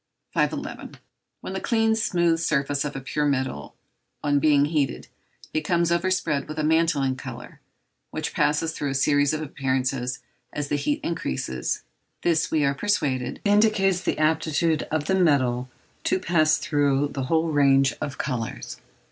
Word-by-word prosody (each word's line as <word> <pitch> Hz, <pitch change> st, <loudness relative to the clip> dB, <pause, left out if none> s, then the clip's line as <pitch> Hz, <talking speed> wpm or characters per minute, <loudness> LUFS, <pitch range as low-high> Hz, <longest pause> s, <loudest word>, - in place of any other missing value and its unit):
511. -, -, -2 dB, 0.4 s
When -, -, -6 dB
the -, -, -2 dB
clean, 225 Hz, -2 st, +2 dB
smooth 175 Hz, -6 st, +1 dB
surface 140 Hz, -3 st, 0 dB
of 145 Hz, -1 st, -4 dB
a 135 Hz, -, -4 dB
pure 150 Hz, +3 st, -1 dB
metal, 130 Hz, -, -2 dB, 0.5 s
on 145 Hz, -1 st, +2 dB
being 145 Hz, -1 st, +4 dB
heated, 145 Hz, -3 st, -1 dB, 0.5 s
becomes 170 Hz, +2 st, +1 dB
overspread 170 Hz, -4 st, 0 dB
with 155 Hz, -, -7 dB
a 155 Hz, -, 0 dB
mantling 155 Hz, -4 st, +2 dB
colour, -, -, -9 dB, 0.5 s
which -, -, -4 dB
passes 150 Hz, +2 st, +1 dB
through 145 Hz, -2 st, -3 dB
a 135 Hz, -, -3 dB
series 145 Hz, +1 st, +3 dB
of 155 Hz, 0 st, -2 dB
appearances 130 Hz, -3 st, -1 dB, 0.4 s
as 145 Hz, -1 st, -3 dB
the -, -, +1 dB
heat 290 Hz, -, -1 dB
increases, 65 Hz, -, -3 dB, 0.4 s
this, 165 Hz, -1 st, +2 dB
we 155 Hz, -2 st, +2 dB
are 140 Hz, -, +2 dB
persuaded, 140 Hz, -8 st, -1 dB
indicates 205 Hz, -3 st, +3 dB
the -, -, -1 dB
aptitude 155 Hz, 0 st, +1 dB
of 155 Hz, -1 st, -1 dB
the 190 Hz, -, 0 dB
metal 130 Hz, -8 st, +2 dB, 0.4 s
to -, -, +2 dB
pass 160 Hz, -4 st, +2 dB
through 145 Hz, -1 st, +1 dB
the 135 Hz, -2 st, -4 dB
whole 165 Hz, +3 st, +1 dB
range 135 Hz, -2 st, +4 dB
of 145 Hz, -3 st, -4 dB
colours. 125 Hz, -5 st, -4 dB
150 Hz, 150 wpm, -25 LUFS, 135-165 Hz, 0.5 s, being